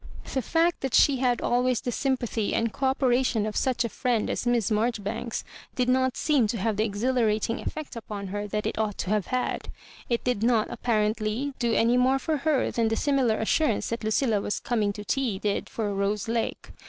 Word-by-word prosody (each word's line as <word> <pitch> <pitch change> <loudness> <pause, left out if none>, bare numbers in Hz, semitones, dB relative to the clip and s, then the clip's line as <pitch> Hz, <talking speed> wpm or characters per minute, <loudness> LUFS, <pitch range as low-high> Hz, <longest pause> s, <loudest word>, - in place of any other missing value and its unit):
The 265 - +1
fact 335 +6 +1
that 265 -2 -1
she 280 -2 +5
had 250 -1 +1
always 250 0 +1
the 245 - -3
sympathy 240 -5 -1
and 230 -1 0
co 270 - 0
operation 255 -4 +2
of 215 -1 -4
such 250 -3 +1
a - - +1
fhend 235 -1 -1
as - - -3
Miss 235 -3 +2
Marjori 215 0 0
banks, 220 +3 -3 0.3
did 250 -1 +1
not 260 0 +2
seem 285 -8 +2
to 230 - -2
have 220 +2 0
the 215 - +2
exhilarating 225 0 0
ef - - -3
fect 310 -4 -7
upon 210 -4 -6
her 205 +1 -3
that 210 +1 -3
it - - -2
ought 215 -2 -1
to 190 - -3
have 210 -3 +1
had. 255 0 -2 0.4
It 235 -1 0
did 250 -5 0
not 230 -2 +2
apparently 220 +3 0
do 235 -2 +1
any 235 +2 +3
more 260 +2 +4
for 310 +3 -1
her 290 -2 +1
than 230 -1 +1
the 225 - +1
"^ - - -4
similar 265 -6 +2
assurance 225 +1 +1
that 230 0 -3
Lucilla 215 0 +1
was 205 - -2
coming 220 -4 0
to 210 0 -8
tea 245 -4 0
did 205 +1 -2
for 210 -3 -2
Rose 200 +2 -1
Lake. 230 0 -2
235 Hz, 215 wpm, -26 LUFS, 215-255 Hz, 0.4 s, she